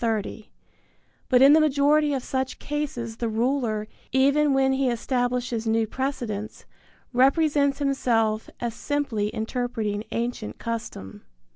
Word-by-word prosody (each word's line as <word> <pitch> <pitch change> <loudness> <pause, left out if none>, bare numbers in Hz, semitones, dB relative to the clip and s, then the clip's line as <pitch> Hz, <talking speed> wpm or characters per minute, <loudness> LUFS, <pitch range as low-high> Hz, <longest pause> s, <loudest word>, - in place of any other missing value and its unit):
30); 220 -1 -2 0.8
but 255 0 +5
in 280 +2 +8
the 315 - +7
majority 295 0 +3
of 270 -3 -2
such 260 0 -2
cases 255 -6 -4
the 235 -1 -2
ruler, 225 -2 0 0.2
even 280 +3 +3
when 270 0 +3
be 265 -1 +1
establishes 245 -1 -1
new 225 0 +2
precedents, 220 -4 -4 0.5
represents 280 +2 +3
himself 230 -6 0
as 235 -2 -3
simply 275 -7 -1
interpreting 220 -2 -2
ancient 235 -2 -3
custom. 220 - -6
245 Hz, 120 wpm, -25 LUFS, 225-275 Hz, 0.8 s, in